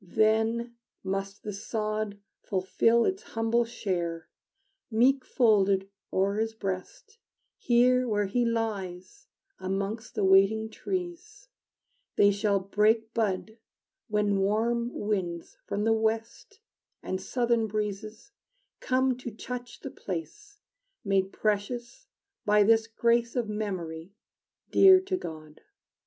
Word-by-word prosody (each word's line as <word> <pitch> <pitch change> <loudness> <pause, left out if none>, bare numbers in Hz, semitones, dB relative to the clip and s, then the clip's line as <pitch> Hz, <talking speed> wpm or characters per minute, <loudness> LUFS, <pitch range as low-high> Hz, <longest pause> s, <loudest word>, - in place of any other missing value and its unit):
Then 220 +4 +1 0.3
must 195 +1 -4
the 210 - -5
sod 215 0 -3 0.2
Fulfill 220 +5 +2
its 385 +2 -1
humble 225 - 0
share, 175 -8 -3 0.6
Meek 255 +4 +3
folded 200 -6 +2 0.2
o'er 195 +2 +1
his 225 0 -1
breast, 220 - -6 0.4
Here 250 +1 +3
where 205 -2 +1
he 240 +5 0
lies 200 -6 -3 0.3
amongst 200 +4 -3
the - - 0
waiting 195 +3 +4
trees: 375 - -5 0.7
They 205 0 +5
shall 200 0 +1
break 215 +3 +1
bud 220 0 -2 0.5
when 210 -2 +1
warm 230 +4 +1
winds 185 -7 -3
from 205 +1 -2
the 225 +1 +3
west 225 - -2 0.4
And 185 0 -3
southern 235 0 +1
breezes 215 - -4 0.5
come 260 0 +1
to 250 - -5
touch 245 +2 -7
the 275 - -6
place 405 - -7 0.4
Made 195 -1 +1
precious 230 +3 -2 0.4
by 210 0 +4
this 225 +1 +4
grace 235 +1 +1
Of 240 -3 0
memory 190 -4 -5 0.6
dear 380 -1 +8
to 375 0 -2
God. 155 - -8
220 Hz, 115 wpm, -28 LUFS, 195-235 Hz, 0.7 s, dear